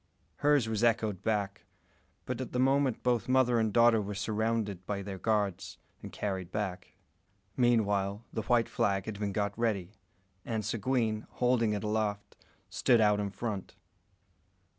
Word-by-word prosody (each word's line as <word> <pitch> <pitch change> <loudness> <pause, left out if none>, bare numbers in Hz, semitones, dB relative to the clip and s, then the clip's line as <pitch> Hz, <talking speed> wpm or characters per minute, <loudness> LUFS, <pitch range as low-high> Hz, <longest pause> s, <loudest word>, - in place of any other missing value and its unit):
Hers 145 -5 +3
was 110 0 -1
echoed 110 -5 +1
back; 100 -2 -2 0.6
but - - -3
at - - -6
the 125 - 0
moment 135 -1 +2
both 125 -1 +1
mother 130 -2 +4
and 110 -1 +1
daughter 115 0 +5
were 100 0 -5
surrounded 105 -1 -1
by 100 -1 -2
their 95 -1 -6
guards, 100 -4 -1 0.2
and - - -8
carried 95 -3 -4
back. 95 -3 -4 0.6
Meanwhile, 105 -4 +1
the 110 - -1
white 115 +1 +2
flag 95 -1 0
had 105 -2 -6
been 105 -1 -1
got 100 +1 -1
ready, 105 -6 -1 0.5
and 110 -3 -3
Seguin, 115 -1 -1
holding 125 -3 +2
it 105 - -3
aloft, 105 -1 -2 0.3
stood 120 -3 +3
out 105 -1 +4
in 100 -1 -1
front. 100 0 -5
110 Hz, 150 wpm, -30 LUFS, 100-115 Hz, 0.6 s, daughter